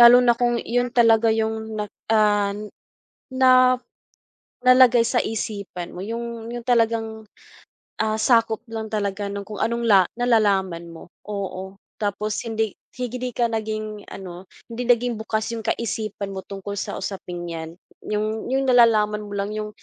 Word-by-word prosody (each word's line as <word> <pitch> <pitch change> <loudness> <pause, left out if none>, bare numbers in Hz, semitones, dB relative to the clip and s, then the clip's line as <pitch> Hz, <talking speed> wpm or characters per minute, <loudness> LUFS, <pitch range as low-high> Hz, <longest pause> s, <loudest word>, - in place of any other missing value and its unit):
lalo 240 +1 +10
na 240 - +6
kung 240 -1 +2 0.2
'yon 245 0 +2
talaga 230 -1 +5
yung 220 0 -1 0.2
na, 210 - -1 0.4
ah, 205 -1 +2 0.9
na 260 0 +7 1.2
nalagay 255 -2 +7
sa 245 - +4
isipan 200 -5 -5
mo, 175 - -8
yung 235 +1 -3 0.3
yung 240 - -5
talagang, 230 -1 +2 1.0
ah, 215 0 0
sakop 230 -2 +3
lang 220 -1 -3
talaga 205 -1 -2
nung 200 -1 -6
kung 210 -2 -6
anong 235 +1 -1
la 195 - +8 0.2
nalalaman 200 -8 +2
mo. - - -10 0.3
Oo, 190 -1 -5 0.2
tapos 210 +1 -1
hindi 220 -2 -1 0.3
hindi 250 0 -3
ka 240 - +1
naging 215 -1 -4
ano, 180 -2 -9 0.2
hindi 235 +1 -5
naging 240 0 +1
bukas 220 0 -1
yung 225 - -6
kaisipan 215 -3 -3
mo 190 - -4
tungkol 200 0 -6
sa 205 - -4
usaping 180 -3 -5
'yan. 160 0 -6 0.4
Yung 215 +2 -2
yung 270 +1 +2
nalalaman 220 -4 +4
mo 205 - -10
lang 200 +1 -2
yung 215 0 -3
215 Hz, 150 wpm, -23 LUFS, 200-235 Hz, 1.2 s, lalo